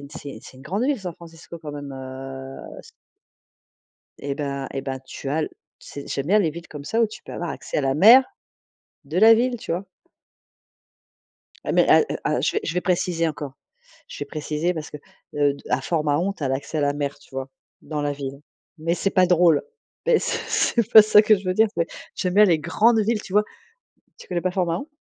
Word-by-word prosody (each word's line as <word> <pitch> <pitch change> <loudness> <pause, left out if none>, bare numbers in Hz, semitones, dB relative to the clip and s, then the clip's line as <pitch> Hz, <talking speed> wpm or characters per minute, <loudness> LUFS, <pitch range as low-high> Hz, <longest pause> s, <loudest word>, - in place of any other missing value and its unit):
une 140 - -11
c'est 140 -5 -8
c'est 135 - -13
une 130 - -14
grande 195 - -2
ville 280 -1 +1
San 180 -2 -5
Francisco 165 0 -12
quand 155 -2 -8
même», 145 -1 -7
heu, 135 0 -8 0.2
c - - -16 1.3
eh 140 +1 -4
ben 140 -2 -3
eh 135 - -2
ben, 135 -1 -3
tu 135 - -7
as 155 +3 0
l 155 - -2 0.3
c'est 140 - -10
j'aime 140 +1 -3
bien 205 +4 +4
les 175 -6 +2
villes 170 +2 -10
comme 145 -2 -9
ça, 225 +9 0
où 230 - +4
tu 215 - -12
peux - - -9
avoir 175 - -4
accès - - -4
à - - +2
la 135 -1 0
mer, 225 - +8 0.8
de 150 +5 -5
la 225 +1 +8
ville, 240 +2 +1
tu 215 - -6
vois? 180 +4 -2 1.8
Ah - - -2
mais - - +4
al - - +6 0.2
ah - - +1
je - - 0
je - - -3
vais 180 - +1
préciser 175 -2 0
encore, 145 -3 -6 0.6
je - - -9
vais - - -19
préciser 155 +3 -2
parce 155 -2 -6
que, - - -7 0.4
heu, 145 -1 +3 0.2
à 125 - +2
Fort-Mahon, 155 +5 0
tu 195 - -12
as 135 - 0
l'accès 135 +4 -3
à - - +1
la 145 0 +2
mer, 145 -1 -3
tu 145 - -22
vois? 135 0 -4 0.3
Dans 150 0 -4
la 145 0 0
ville. 140 -1 -6 0.4
Mais 165 +2 0
c'est 195 +3 -1
pas 185 -2 +4
drôle, 175 -2 +4 0.4
beh, 480 -3 +5
c'est - - -2 0.4
c'est 225 - -12
pas 220 - +11
ça 215 0 +6
que 215 0 +5
je 200 - -13
veux 185 0 0
dire, 220 +3 +4
c'est 170 - +1 0.3
j'aime 180 -1 -2
bien 210 +1 +7
les 170 -5 +3
grandes 220 +9 +3
villes, 215 +1 0
tu - - -11
vois? 210 +1 +4 0.7
Tu - - -13
connais 175 -2 -1
pas 185 - -1
Fort-Mahon? 180 - -2
165 Hz, 220 wpm, -23 LUFS, 145-195 Hz, 1.8 s, pas